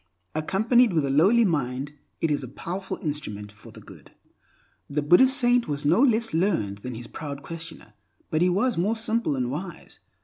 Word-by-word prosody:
Accompanied 220 +8 +2
with 155 -4 +1
a 135 - -1
lowly 200 - +4
mind, 140 -4 -2 0.3
it 165 - +1
is 145 - 0
a - - -6
powerful 190 +8 -6
instrument 105 -10 -5
for 110 +2 -15
good. 100 - -15 0.8
The 145 +1 -1
Buddhist 260 - +5
saint 245 -2 +3
was 145 -1 -3
no 170 +10 +4
less 230 -4 +2
learned 160 - 0
than 125 +3 -7
his 120 +1 -8
proud 140 +2 -7
questioner, 165 -8 -9 0.4
but 155 - +1
he 180 - +4
was 200 +3 +1
more 205 +6 +1
simple 225 -7 0
and 125 -2 -2
wise. 175 +4 -7
160 Hz, 175 wpm, -25 LUFS, 135-210 Hz, 0.8 s, Buddhist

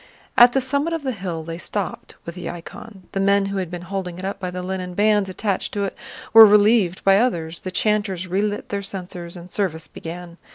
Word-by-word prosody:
At 240 0 +8
the 270 - +2
summit 280 +5 -1
of 325 -3 -3
the 265 - -1
hill 180 -7 -5
they 165 +1 -6
stopped 200 +1 -5
with 170 - -6
the 180 - -6
icon; 190 +3 -10
the 195 - -2
men 200 0 +3
who 195 0 -3
had 185 -3 -2
been 175 0 -6
holding 180 -1 -4
it 185 - -6
up 195 0 -4
by 185 -2 -3
the 180 0 -5
linen 185 -1 -4
bands 205 -1 +3
attached 195 +1 -2
to 200 - 0
it 195 - -3 0.4
were 225 0 +12
relieved 210 -3 +5
by 195 0 +5
others, 170 -9 -1
the 185 - -6
chanters 200 -2 0
relit 205 +3 -2
their 200 0 -2
censers, 180 -3 -6
and 175 +1 -11
service 160 -6 -2
began. 170 +2 -9
190 Hz, 215 wpm, -22 LUFS, 180-205 Hz, 0.4 s, were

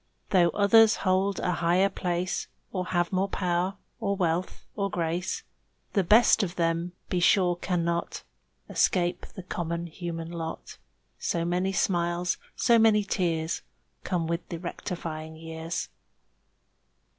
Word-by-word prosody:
Though 175 -3 +5
others 220 +2 +6
hold 190 +1 +2
a 180 - 0
higher 175 +3 +3
place 180 -2 -2 0.2
Or 185 -2 -3
have 175 -1 0
more 190 +1 +1
power 180 +1 0 0.2
or 200 -3 0
wealth 180 -1 -1
or 200 -2 -1
grace, 175 0 -2 0.5
The 195 - +3
best 220 +5 +6
of 190 -3 -2
them, 170 +1 0 0.2
be 180 - +1
sure, 175 0 +4
cannot 170 -1 -2 0.4
Escape 175 -2 +1
the 190 - -7
common 170 -1 -3
human 165 -1 -6
lot; 165 -1 -6 0.4
So 170 -1 -1
many 180 +2 0
smiles, 175 -2 0 0.2
so 235 -2 +4
many 220 -2 +5
tears 165 -5 -1 0.4
Come 175 -3 -1
with 170 +1 -3
the 170 - -4
rectifying 165 -2 -5
years. 160 +1 -5
175 Hz, 130 wpm, -27 LUFS, 170-190 Hz, 0.5 s, others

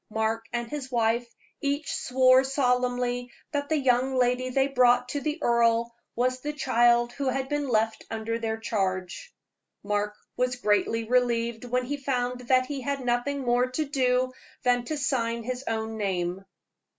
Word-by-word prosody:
Mark 220 +1 -1
and 240 0 -2
his 270 -1 -6
wife 235 0 +1 0.3
each 285 +2 -1
swore 255 0 +4
solemnly 250 -2 0 0.2
that 285 -1 -2
the 315 - +2
young 260 -1 +2
lady 250 0 +1
they 270 +1 +2
brought 250 -2 +3
to 285 +2 -2
the 305 +2 -2
earl 235 0 +2 0.2
was 255 +2 0
the 295 +3 -4
child 240 -3 +3
who 275 +1 -1
had 265 +1 -1
been 290 -1 -1
left 225 -2 0
under 225 +1 -3
their 225 -1 -2
charge. 195 - -3 0.5
Mark 210 0 -1 0.2
was 250 0 0
greatly 225 0 +1
relieved 235 -1 +1
when 250 +1 -1
he 290 +3 -3
found 250 -2 -2
that 255 0 +4
he 280 -1 -5
had 275 0 -3
nothing 245 +4 0
more 245 0 +2
to 280 +5 -2
do 255 -2 +1 0.3
than 245 -1 +3
to 310 +4 -3
sign 235 -6 -1
his 255 +2 -4
own 220 0 -2
name. 190 -2 -2
245 Hz, 160 wpm, -27 LUFS, 230-265 Hz, 0.5 s, swore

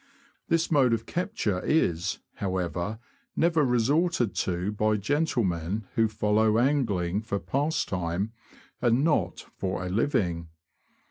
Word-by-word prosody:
This 165 0 +1
mode 135 -6 +4
of 115 0 -1
capture 175 - -1
is, 90 - +1 0.2
however, 95 +1 -2 0.4
never 165 -2 +3
resorted 125 - +2
to 90 +2 -1
by 105 0 +1
gentlemen 105 - 0
who 115 0 +3
follow 105 +1 +2
angling 110 -9 +1
for 110 -3 -2
pastime, 100 - -1 0.5
and 120 +2 +3
not 145 - 0
for 95 -1 -2
a - - -3
living. 90 - 0
110 Hz, 115 wpm, -27 LUFS, 90-140 Hz, 0.5 s, mode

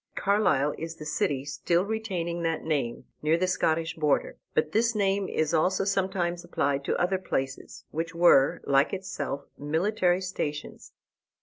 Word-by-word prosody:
Carlisle 170 -9 +2
is 165 0 -5
the 155 - -9
city 140 -2 -1
still 170 +5 0
retaining 185 -6 -3
that 165 -1 -1
name, 140 -7 -2 0.2
near 155 +2 +3
the 185 - +1
Scottish 165 -3 0
border. 150 -3 0 0.2
But 155 0 +1
this 230 +3 +2
name 195 -1 +1
is 155 0 0
also 185 +4 +2
sometimes 190 -3 0
applied 140 0 -1
to - - 0
other 185 +1 +1
places, 135 -7 -4
which 165 +2 -3
were, 170 -5 +5
like 140 +1 +3
itself, 190 -7 -4
military 180 +5 +1
stations. 150 -6 -5
170 Hz, 145 wpm, -27 LUFS, 150-190 Hz, 0.2 s, were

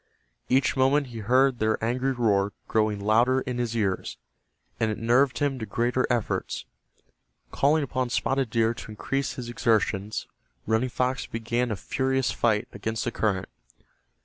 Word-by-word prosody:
Each 130 +2 +3
moment 135 +2 +3
he 115 - -5
heard 130 +4 +3
their 110 0 +2
angry 125 +3 0
roar 105 -5 +1
growing 110 -2 +1
louder 115 +6 +3
in 125 -2 -4
his 120 -1 -1
ears, 95 -4 -1 0.6
and 110 - +1
it 110 - -2
nerved 125 +4 +3
him 145 -3 0
to 110 - -4
greater 125 +2 0
efforts. 120 -3 -1 0.9
Calling 150 +2 +3
upon 130 -2 -2
Spotted 135 +1 0
Deer 115 0 +2
to 120 - -10
increase 135 +6 -2
his 125 -4 -6
exertions 110 -3 0 0.4
Running 110 +4 +1
Fox 125 +2 -1
began 120 +2 -1
a 110 - -1
furious 130 +6 0
fight 110 -3 +1
against 110 0 -3
the 120 - -1
current. 100 -5 -1
120 Hz, 150 wpm, -26 LUFS, 110-130 Hz, 0.9 s, Each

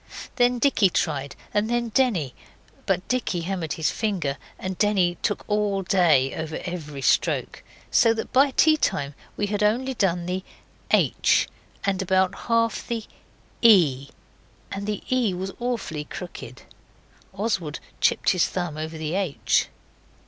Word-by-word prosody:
Then 245 0 +3
Dicky 235 -6 +3
tried, 140 -5 -2 0.2
and 210 +2 +1
then 240 -1 0
Denny, 210 - +1 0.5
but 190 -2 0
Dicky 245 -8 -1
hammered 170 -3 -3
his 160 - 0
finger, 175 - -2 0.2
and 185 0 -4
Denny 190 -4 +2
took 205 - -1
all 205 -2 0
day 170 -9 +3
over 160 -1 -4
every 150 -6 -6
stroke, - - +1 0.3
so 230 - +5
that 220 - -5
by 275 +2 +5
tea 310 +3 +4
time 145 - -1 0.2
we 205 - 0
had 205 0 -2
only 245 +6 +1
done 180 -7 0
the 185 +1 -3 0.5
H, - - +3 0.4
and 195 -1 0
about 190 0 +2 0.2
half 230 0 +1
the 230 -2 -2 0.6
E 155 - +5 0.6
and 200 +1 -4
the 210 -1 -3
E 225 -8 +1
was 190 +2 -4
awfully 235 -11 -3
crooked. 145 -8 -9 0.7
Oswald 190 -6 -2 0.2
chipped - - +3
his 180 -2 +2
thumb 175 -4 -3
over 160 +1 -5
the 155 0 -3
H. 185 -6 +1
190 Hz, 140 wpm, -24 LUFS, 160-220 Hz, 0.7 s, so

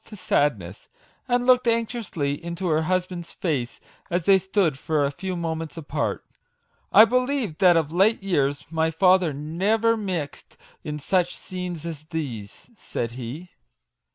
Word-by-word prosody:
49 - - -20
to - - -13
sadness, 105 -11 0 0.4
and 245 -1 +1
looked 250 -1 +4
anxiously 220 - -1
into 170 +1 -3
her 155 0 +2
hus 185 +3 +1
band's 175 -2 -8
face 135 -9 -2 0.3
as 175 -1 -1
they 195 -1 +6
stood 185 -6 0
for 150 -2 +1
a 140 - -1
few 185 +6 -5
moments 165 -1 -4
apart 155 -3 -3 0.4
" - - -46 0.3
I 220 - +9
believed 250 - 0
that 180 -3 +6
of 155 -2 0
late 195 +4 +3
years 145 -6 0
my 160 0 +1
father 180 0 +4
never 195 +11 +1
mixed 180 -9 -5 0.3
in 150 0 -4
such 175 +4 0
scenes 180 -3 -6
as 155 -3 -6
these/' 135 - -6
said 120 - -4
he. 130 +9 -7
170 Hz, 155 wpm, -24 LUFS, 150-195 Hz, 0.4 s, I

